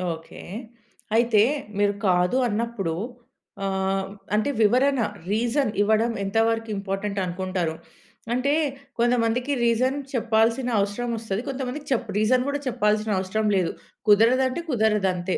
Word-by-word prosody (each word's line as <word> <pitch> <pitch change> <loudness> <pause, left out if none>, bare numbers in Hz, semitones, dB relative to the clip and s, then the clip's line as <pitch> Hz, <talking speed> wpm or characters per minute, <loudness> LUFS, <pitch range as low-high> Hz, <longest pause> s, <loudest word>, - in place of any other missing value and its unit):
Okay. 160 0 -12 0.7
అయితే, 230 -2 +4 0.3
మీరు 205 0 +2
కాదు 180 +6 +3
అన్నప్పుడు, 215 -6 -2 0.7
ఆహ్, 190 0 -1 0.3
అంటే, 215 +6 +1
వివరణ, 255 +5 +3 0.3
రీజన్ 235 +3 +1
ఇవ్వడం 220 +3 +3
ఎంతవరకింపార్టెంటనుకుంటారు? 195 -5 -1 0.6
అంటే, 260 +4 +1 0.5
కొంతమందికి 240 +2 +1
రీజన్ 255 +4 +2 0.2
చెప్పాల్సిన 230 +1 +2
అవసరమొస్తది, 220 0 -2
కొంతమందికి 270 +2 -4
చప్ 235 -3 0
రీజన్ 250 +4 +3
గూడా 285 0 -1
చెప్పాల్సిన 215 -3 +1
అవసరం 210 +3 -1
లేదు. 180 -3 +1 0.4
కుదరదంటే, 255 +8 +4
కుదరదంతే. 200 -7 +1
220 Hz, 100 wpm, -24 LUFS, 195-245 Hz, 0.7 s, అయితే